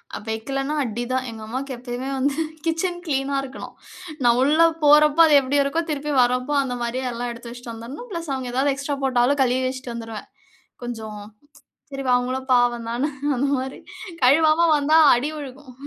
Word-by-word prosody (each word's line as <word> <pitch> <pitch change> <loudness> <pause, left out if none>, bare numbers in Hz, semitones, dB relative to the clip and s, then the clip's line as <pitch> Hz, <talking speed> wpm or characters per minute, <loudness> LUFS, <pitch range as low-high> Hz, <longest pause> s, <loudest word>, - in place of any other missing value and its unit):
அ - - -3
வெக்கலன்னா 270 +6 -3
அடிதான். 245 +2 -3
எங்கம்மாவுக்கு 235 +5 -6
எப்பவுமே 245 +2 -5
வந்து 275 +1 0 0.3
கிட்சன் 350 +2 -1
க்ளீனா 275 -2 -1
இருக்கணும். 270 0 -9 0.5
நான் 240 0 +4
உள்ள 300 +4 +3 0.2
போறப்போ, 300 +2 +6
அது 295 - +5
எப்படி 270 +2 -1
இருக்கோ, 300 +4 -1
திருப்பி 295 0 -3
வரப்போ 250 +3 +1
அந்த 250 -2 -4
மாதிரியே 255 +2 -3
எல்லாம் 240 +1 -4
எடுத்து 235 0 -10
வச்சுட்டு 245 -1 -9
வந்துடணும். 250 - -9
பிளஸ் 335 -4 -5
அவங்க 260 -2 -4
ஏதாவது 275 +2 +2
எக்ஸ்ட்ரா 285 +1 -3
போட்டாலும், 260 +2 +2
கழுவி 255 0 +2
வச்சுட்டு 255 -1 -6
வந்துருவேன். 225 -2 -8 0.6
"கொஞ்சம், 220 -3 -6 0.7
சரி 275 -1 -5
வா 250 - +4
அவங்களும் 260 +2 -3
பாவம் 240 -1 +2
தான" 270 +6 -1 0.3
அந்த 265 - +1
மாரி, 265 +1 -6 0.4
கழுவாம 310 +5 +5
வந்தா 300 +2 +3 0.2
அடி 270 +6 -2
விழுகும். 280 -2 -10
260 Hz, 165 wpm, -22 LUFS, 245-285 Hz, 0.7 s, போறப்போ